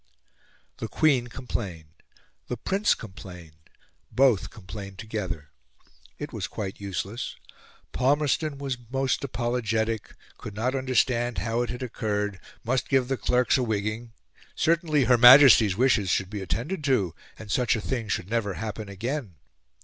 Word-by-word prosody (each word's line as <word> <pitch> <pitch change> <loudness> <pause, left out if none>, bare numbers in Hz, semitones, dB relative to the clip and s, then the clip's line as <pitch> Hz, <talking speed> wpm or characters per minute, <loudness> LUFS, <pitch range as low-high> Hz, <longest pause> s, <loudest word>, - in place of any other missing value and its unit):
The - - -4
Queen 135 -6 +2
complained, 95 -11 -6 0.5
the 125 - -3
Prince 195 - +1
complained: 85 -5 -12 0.4
both 125 -3 +3
complained 100 -2 -9
together. 95 -10 -5 0.7
It - - -7
was - - -3
quite 100 -2 -6
useless. 100 +4 -4 0.6
Palmerston 145 +2 +1
was 135 -3 -4
most 135 +1 0
apologetic 115 -4 -2 0.2
could 105 - -8
not 120 +5 0
understand 125 -3 +1
how 115 +6 -1
it 120 - -2
had 125 +2 -5
occurred 105 -4 -2 0.2
must 125 +3 -1
give 130 -2 +2
the 135 - +1
clerks 125 +2 +2
a - - +1
wigging 110 +1 -2 0.4
certainly 160 -3 +2
Her 120 0 +4
Majesty's 120 -6 +8
wishes 115 -6 +3
should 95 +1 0
be 105 -2 -4
attended 135 - -3
to, 100 - +1 0.2
and 110 -2 -8
such 125 +3 +2
a - - -2
thing 120 0 -3
should 95 - -2
never 105 -3 -1
happen 110 -1 -5
again. 115 - -4
115 Hz, 140 wpm, -26 LUFS, 100-130 Hz, 0.7 s, Majesty's